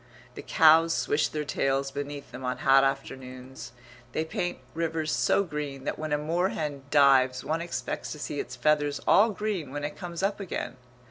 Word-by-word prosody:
The - - -8
cows 165 +1 +5
swish 145 +1 +1
their 150 -1 -4
tails 135 -1 0
beneath 145 0 -6
them 125 +1 -8
on 125 0 -2
hot 135 0 +6
afternoons; 130 -2 -4 0.4
they 160 - -1
paint 175 +2 -3 0.2
rivers 160 -1 -1
so 200 - +2
green 150 -5 -5
that - - -3
when 155 -1 -4
a 150 - +3
moorhen 155 -2 -1
dives 130 -3 +4
one 160 +2 -1
expects 130 -7 -4
to - - -9
see 145 -1 -4
its 125 - -5
feathers 145 +2 +1
all 215 +3 +6
green 205 -8 -3
when 145 +1 -5
it 145 - -4
comes 175 -1 -6
up 200 +1 0
again. 145 -9 -5
145 Hz, 180 wpm, -27 LUFS, 135-165 Hz, 0.4 s, hot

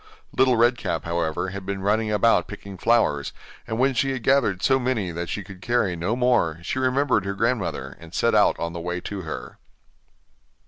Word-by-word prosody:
Little 130 -2 +4
Red 120 +2 +3
Cap, - - -2
however, 85 +1 -1
had 100 +1 -6
been 95 0 -4
running 105 +2 +1
about 105 -4 +3
picking 100 -1 -9
flowers, 100 -9 +1 0.3
and 110 - -3
when 135 +2 +2
she 135 +3 +1
had 130 -3 -5
gathered 110 -9 +2
so 135 0 +4
many 120 -8 -1
that 85 0 -5
she 100 - -3
could 95 -1 -12
carry 110 -5 +1
no 90 +7 -1
more, 125 -11 +2
she 130 - -2
remembered 130 -3 +2
her 100 0 -3
grandmother, 115 -2 -1
and 85 -1 -13
set - - +1
out - - +4
on 85 0 -3
the 85 - -5
way 90 +1 -3
to 100 +1 -5
her. 80 -3 -7
100 Hz, 195 wpm, -24 LUFS, 90-120 Hz, 0.3 s, Little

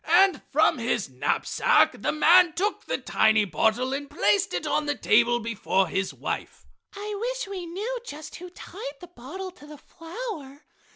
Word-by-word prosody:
And 375 -5 +5
from 300 -3 +3
his 230 - -1
knapsack 130 +3 +2
the - - +1
man 340 +2 +5
took 400 +7 -2
the - - -1
tiny 220 -1 +3
bottle 220 - +1
and 285 +1 -4
placed 200 0 +2
it 175 - -3
on 300 - 0
the 290 - 0
table 240 0 +3
before 205 -4 0
his 190 0 -1
wife. - - -5 0.3
"I 415 +1 -5
wish - - -3
we 375 -3 -6
knew 425 +9 -4
just 305 -9 -9
who 360 +1 -9
tied 345 -5 -9
the 355 - -12
bottle 370 +10 -7
to 355 -5 -16
the 300 0 -11
flower!" 330 - -8
300 Hz, 170 wpm, -26 LUFS, 235-370 Hz, 0.3 s, And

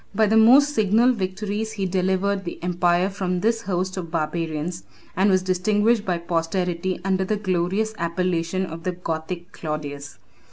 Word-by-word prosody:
By 220 +1 +4
the 215 +1 +2
most 265 +7 +6
signal 220 +2 +4
victories 210 +2 -3
he 200 -3 -2
delivered 190 +2 0
the 170 - -6
empire 175 0 +2
from 185 -2 -2
this 225 +2 +1
host 185 -2 -2
of 175 -3 -4
barbarians, 165 +1 -3 0.3
and 195 +2 +3
was 185 -1 +3
distinguished 205 +4 +2
by 180 -2 0
posterity 170 +2 -1
under 190 -1 +1
the 210 +3 -1
glorious 190 +2 0
appellation 170 +1 -1
of 165 -1 -8
the 180 +2 -2
Gothic 170 +1 -5
Claudius. 145 -2 -6
185 Hz, 155 wpm, -23 LUFS, 170-205 Hz, 0.3 s, most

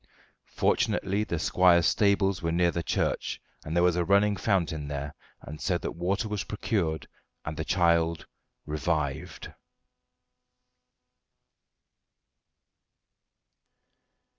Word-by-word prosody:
Fortunately 100 +3 +1
the 85 - -3
squire's 85 +1 +4
stables 100 -2 +2
were 85 -1 -1
near 85 +1 +2
the 85 - -2
church, - - -1 0.2
and 80 +1 -5
there 85 - +3
was 90 -1 +3
a 90 - +1
running 100 +3 +3
fountain 85 -7 -1
there, 70 0 -4 0.5
so 90 0 0
that - - -4
water 95 +6 -1
was 105 -2 -3
procured, 90 -8 -2 0.4
and 75 - -4
the 80 - -3
child 85 -2 +2 0.4
revived. 75 -2 -3
85 Hz, 100 wpm, -28 LUFS, 80-95 Hz, 0.5 s, squire's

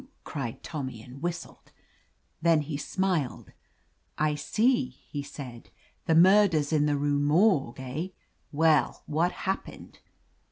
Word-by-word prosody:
cried 135 -6 -5
Tommy 130 -7 -5
and 125 +5 -12
whistled. 175 +1 -5 0.7
Then 165 -2 +4
he 150 0 -5
smiled. 175 -3 -2 0.7
"I 155 0 +2
see," 220 - +1
he 145 +3 -8
said; 135 -4 -9 0.4
"The 160 - +4
Mur 195 +5 +7
ders 155 -4 -1
in 150 -1 +3
the 145 -1 +1
Rue 145 0 +1
Morgue, 145 - +3
eh? 130 +7 -4 0.4
Well, 155 0 +2
what 165 +4 +1
happened 190 0 -5
150 Hz, 125 wpm, -28 LUFS, 140-170 Hz, 0.7 s, Mur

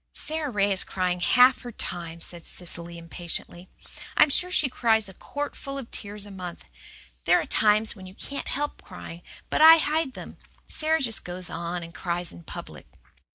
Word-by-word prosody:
"Sara 310 -1 -1
Ray 205 -4 +2
is 190 - +2
crying 180 -1 -1
half 250 +8 +5
her 245 - -7
time," 170 -5 -4
said 170 0 -2
Cecily 170 -1 -4
impatiently. 175 +1 -5 0.5
"I'm 300 - +6
sure 360 +5 +2
she 340 -6 +2
cries 225 -4 +2
a 190 - -11
quartful 280 +4 -5
of 265 -4 -7
tears 205 0 -5
a 205 - -11
month. 180 -3 -8 0.6
There - - +5
are - - -2
times 215 +1 +3
when 190 -3 -11
you 185 - -13
can't 280 +5 -5
help 290 +2 -2
crying. 175 -2 -10 0.3
But - - +2
I 325 +1 +11
hide 310 -3 0
then. - - -9 0.3
Sara 315 +1 +2
just 230 -4 +2
goes 180 0 -4
and 170 0 -4
cries 175 -1 -1
in 85 - -12
public." - - -9
200 Hz, 175 wpm, -26 LUFS, 175-270 Hz, 0.6 s, I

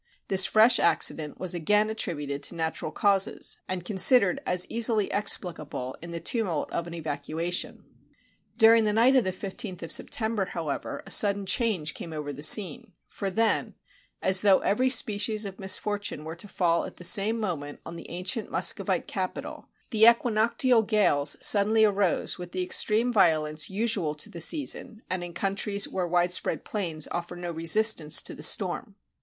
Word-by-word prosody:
This 190 -1 +5
fresh 225 +2 +5
accident 155 -2 0
was 185 -2 -3
again 210 +6 +2
at 220 - -7
tributed 145 -5 -3
to - - -4
natural 160 -1 -3
causes, 200 +3 0
and 180 -2 -4
considered 200 0 +4
as 180 0 +1
easily 225 -3 +1
ex 205 +1 +3
pHcable 150 -7 -7
in 170 - -8
the 170 0 -5
tumult 195 - -2
of 170 - -3
an 170 - -8
evacuation. 160 +2 -4 0.7
During 225 0 +6
the 210 - 0
night 240 +5 +4
of 255 - +4
the 185 - -2
15th 185 -1 -6
of 165 - -7
September, 220 -1 0
however, 165 -6 -5
a - - -10
sudden 200 -1 +3
change 190 -6 -1
came 165 - -8
over 150 -2 -5
the 140 - -9
scene; 180 +2 +2 0.2
for 195 - -4
then, 225 +3 0 0.5
as 190 0 +3
though 195 -2 +5
every 255 +6 +1
species 215 -3 0
of 195 -1 -8
misfortune 205 -3 -1
were 160 +1 -7
to 190 +5 -12
fall 170 -3 0
at - - -11
the - - -10
same 200 +6 +2
mo 200 -6 -2
ment 145 -1 -10
on 165 - -8
the 170 - -10
ancient 185 +5 -3
Muscovite - - 0
capital, - - -6 0.2
the 220 0 +5
equinoctial 235 +1 +3
gales 190 -10 +1
suddenly 215 +2 +4
arose 200 -3 0
with 175 -1 -9
the 185 - -1
extreme 225 +6 0
violence 155 -6 +2
usual 195 -6 -1
to 150 - -3
the 170 - -7
season, 230 - -1
and 185 -1 -1
in 175 -1 -9
countries 200 +2 -1
where 180 -2 -3
widespread 175 +1 0
plains 170 -7 -3
offer 175 0 -5
no 175 0 -6
resistance 165 0 +2
to - - -6
the - - -11
storm. - - -1
190 Hz, 170 wpm, -26 LUFS, 170-215 Hz, 0.7 s, During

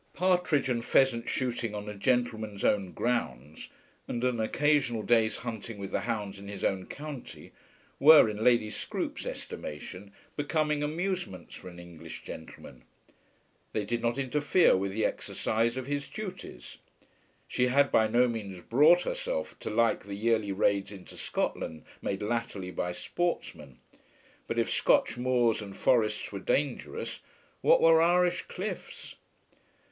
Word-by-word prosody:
Partridge 180 -6 +2
and 120 -2 -1
pheasant 120 -2 +2
shooting 120 -4 -2
on 105 0 -6
a 105 - -4
gentleman's 110 -2 -1
own 100 -3 +2
grounds, 80 - -3 0.4
and 120 - -3
an 125 -2 +1
occasional 135 -1 +1
day's 110 -2 +3
hunting 115 -2 -6
with 100 -1 -6
the - - 0
hounds 105 -4 -3
in 100 - -10
his 100 -1 -7
own 95 -2 0
county, 145 -3 -8 0.5
were, 150 -3 +9
in 105 0 -3
Lady 115 -3 +4
Scroope's - - -4
estimation, 90 +6 -7 0.2
becoming 150 0 0
amusements 165 - -3
for 95 - -9
an 90 - -13
English 85 -2 -10
gentleman. 80 -5 -10 0.9
They 105 -2 -1
did 120 +3 -2
not 120 +1 0
interfere 145 +6 +3
with 95 +1 -1
the 110 +2 0
exercise 115 +3 -1
of 130 - -3
his 145 0 -3
duties. 185 - -8 0.7
She 125 - +1
had 140 +2 +3
by 110 - +4
no 120 +3 +4
means 105 -6 -5
brought 150 - +5
herself - - -3
to - - -5
like 115 -1 +1
the 100 0 -6
yearly 110 -1 +1
raids 100 0 +1
into 95 -3 -11
Scotland 80 -1 -3 0.2
made 100 +1 -3
latterly 105 -4 -3
by 90 -1 -2
sportsmen. 90 - -3 0.7
But - - -3
if - - +2
Scotch 115 - +3
moors 120 -3 +2
and 100 -2 -9
forests 110 -4 +1
were 100 - -5
dangerous, 140 +5 -2 0.4
what - - +5
were 165 0 +7
Irish 175 +1 +3
cliffs! 190 0 -6
115 Hz, 145 wpm, -29 LUFS, 100-145 Hz, 0.9 s, were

